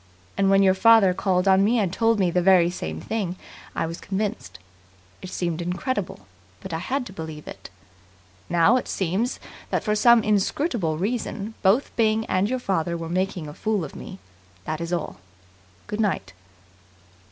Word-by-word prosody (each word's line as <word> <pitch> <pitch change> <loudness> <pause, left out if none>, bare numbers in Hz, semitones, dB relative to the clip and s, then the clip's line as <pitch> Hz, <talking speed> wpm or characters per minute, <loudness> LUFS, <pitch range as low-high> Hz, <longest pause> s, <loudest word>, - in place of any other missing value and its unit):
And 195 -1 +2
when 195 0 +5
your 190 -1 +5
father 205 -1 +5
called 180 0 0
on 190 0 +5
me 230 +4 +3
and 195 -5 0
told 225 +1 +2
me 180 -3 +2
the 180 - +2
very 175 -2 +5
same 80 - -5
thing 195 - -3 0.4
I - - 0
was 165 +2 -6
convinced. 205 +2 -3 0.6
It 185 - -7
seemed 175 -2 -2
incredible, 180 - -3 0.3
but - - -8
I 160 - -1
had 255 +8 -2
to 190 - -10
believe 160 -3 -8
it. - - -9 0.8
Now 175 +8 +4
it - - -3
seems 195 +7 -1 0.3
that, - - -1
for 210 - 0
some 235 +1 +5
inscrutable 210 - 0
reason, 215 +2 -3
both 205 +8 +2
Byng 220 -1 +2
and 185 +3 +1
your 255 - 0
father 175 -7 -1
were 165 -1 -6
making 185 -2 -2
a 150 - -8
fool 210 -1 -1
of 140 - -11
me. 190 - -9 0.5
That's 165 +2 -4
all. 170 - -3 0.7
Good 210 +1 -3
night." 140 - -1
190 Hz, 170 wpm, -24 LUFS, 170-220 Hz, 0.8 s, when